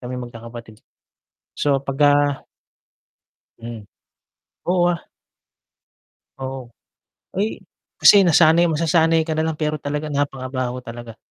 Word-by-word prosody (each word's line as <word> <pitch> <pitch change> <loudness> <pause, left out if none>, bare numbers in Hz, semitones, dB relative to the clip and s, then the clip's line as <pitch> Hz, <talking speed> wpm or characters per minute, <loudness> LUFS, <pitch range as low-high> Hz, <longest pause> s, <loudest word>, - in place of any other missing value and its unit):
kaming 125 0 -6
magkakapatid. 115 -2 -11 0.7
So, 140 -2 +1
'pagka 145 +1 +2 1.2
Hmm. 115 -1 -8 0.8
Oo, 175 0 +2
ah. 170 -1 -2 1.4
Oo. 130 -2 -6 0.7
Ay, 205 +3 -2 0.4
kasi 200 -1 +8
nasanay 170 0 +5
masasanay 160 +1 +2
ka 160 - -1
na 160 - 0
lang 160 -1 -2
pero 155 -1 -1
talaga 150 +2 -3
napakabaho 130 -3 -3
talaga. 115 -2 -10
145 Hz, 100 wpm, -21 LUFS, 125-160 Hz, 1.4 s, kasi